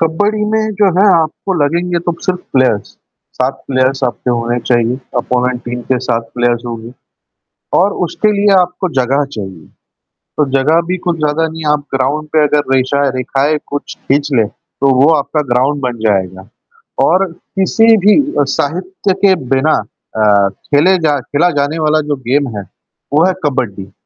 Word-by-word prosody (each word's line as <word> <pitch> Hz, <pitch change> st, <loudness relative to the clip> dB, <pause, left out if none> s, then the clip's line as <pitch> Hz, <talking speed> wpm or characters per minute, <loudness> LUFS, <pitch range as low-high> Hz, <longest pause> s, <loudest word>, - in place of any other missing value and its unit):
कबड्डी 205 Hz, +7 st, 0 dB
में 220 Hz, 0 st, 0 dB
जो 205 Hz, -, +4 dB
है 200 Hz, -, +5 dB, 0.2 s
आपको 165 Hz, +4 st, -4 dB
लगेंगे 170 Hz, +4 st, 0 dB
तो 175 Hz, 0 st, -2 dB
सिर्फ़ 180 Hz, -1 st, -1 dB
प्लेयर्स 130 Hz, -6 st, +2 dB, 0.5 s
7 130 Hz, +2 st, -1 dB
प्लेयर्स 130 Hz, 0 st, 0 dB
आपके 125 Hz, 0 st, -2 dB
होने 120 Hz, 0 st, -1 dB
चाहिए, 120 Hz, 0 st, +1 dB, 0.2 s
अपोनेंट 125 Hz, 0 st, -1 dB
टीम 120 Hz, 0 st, -4 dB
के 130 Hz, -, +3 dB
7 115 Hz, 0 st, -1 dB
प्लेयर्स 120 Hz, -1 st, 0 dB
होंगे 115 Hz, 0 st, -7 dB, 0.9 s
और 195 Hz, +3 st, +2 dB
उसके 210 Hz, +5 st, 0 dB
लिए 205 Hz, -1 st, +3 dB
आपको 180 Hz, +1 st, -1 dB
जगह 135 Hz, +3 st, +1 dB
चाहिए, 95 Hz, -6 st, -7 dB, 0.7 s
तो 150 Hz, -, +3 dB
जगह 155 Hz, +5 st, +3 dB
भी 185 Hz, -, 0 dB
कुछ 175 Hz, -1 st, +1 dB
ज़्यादा 155 Hz, +1 st, 0 dB
नहीं 160 Hz, 0 st, -8 dB
है 150 Hz, -, +3 dB
आप 145 Hz, -1 st, -1 dB
ग्राउंड 140 Hz, +4 st, -1 dB
पे 155 Hz, -1 st, +4 dB
अगर 145 Hz, -2 st, 0 dB
रेशा 135 Hz, +2 st, +1 dB
रेखाएँ 135 Hz, +4 st, 0 dB
कुछ 145 Hz, 0 st, -5 dB
खींच 140 Hz, +2 st, 0 dB
लें, 115 Hz, -4 st, +3 dB
तो 135 Hz, +5 st, -2 dB
वो 140 Hz, -, +5 dB
आपका 150 Hz, +1 st, 0 dB
ग्राउंड 135 Hz, +4 st, +1 dB
बन 120 Hz, -2 st, -4 dB
जाएगा 95 Hz, -1 st, -1 dB, 0.6 s
और 190 Hz, +2 st, +3 dB
किसी 200 Hz, +6 st, +2 dB
भी 210 Hz, +6 st, +4 dB, 0.2 s
अ, -, -, +4 dB
साहित्य 185 Hz, +5 st, -1 dB
के 195 Hz, -1 st, +6 dB, 0.2 s
बिना 150 Hz, +4 st, +2 dB, 0.4 s
अ, 105 Hz, -2 st, +3 dB
खेले 145 Hz, -, +1 dB
जा 145 Hz, -1 st, +1 dB
खेला 145 Hz, +6 st, +1 dB
जाने 150 Hz, +3 st, -2 dB
वाला 155 Hz, +1 st, +3 dB
जो -, -, 0 dB
गेम 135 Hz, -5 st, 0 dB
है, 100 Hz, -, -4 dB, 0.5 s
वो 155 Hz, +4 st, +4 dB
है 190 Hz, -, +2 dB
कबड्डी। 105 Hz, -9 st, -2 dB
145 Hz, 165 wpm, -14 LUFS, 125-170 Hz, 0.9 s, के